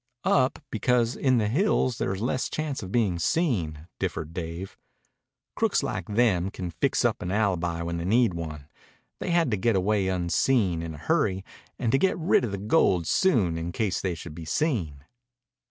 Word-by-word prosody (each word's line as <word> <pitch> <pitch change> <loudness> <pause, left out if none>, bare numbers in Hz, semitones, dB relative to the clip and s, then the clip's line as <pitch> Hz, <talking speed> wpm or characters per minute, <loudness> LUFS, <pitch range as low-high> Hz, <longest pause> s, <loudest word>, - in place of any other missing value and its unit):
"Up, 130 -1 +3
because 120 +1 +1
in 130 -2 +2
the 105 -2 +1
hills 130 - +1
there's 95 +1 -2
less 130 +1 -1
chance 155 -3 -3
of 95 -2 -7
being 100 -7 +1
seen," 85 - 0
differed 80 +1 -3
Dave. 85 +2 -6 0.8
"Crooks - - +1
like 95 -2 -3
them 105 -5 +2
can 90 -3 -6
fix - - 0
up - - +1
an 90 - -3
alibi 90 -5 0
when 85 0 -3
they 85 - -4
need 115 +1 +3
one. 80 -4 -6 0.5
They - - -4
had 170 -6 +2
to 105 - +1
get 115 +3 +1
away 95 +1 +1
unseen, 90 +1 +1
in 80 -1 -5
a - - -10
hurry, 95 +5 0 0.3
and 115 - 0
to 135 - +3
get 190 - +2
rid 165 -5 +3
of 120 - -1
the 100 - -3
gold 95 - +2
soon 100 - +2
in 85 +1 -4
case 100 -1 -1
they 90 -3 -1
should 80 -1 -9
be 80 +1 -8
seen." 80 - -1
95 Hz, 185 wpm, -26 LUFS, 85-120 Hz, 0.8 s, Up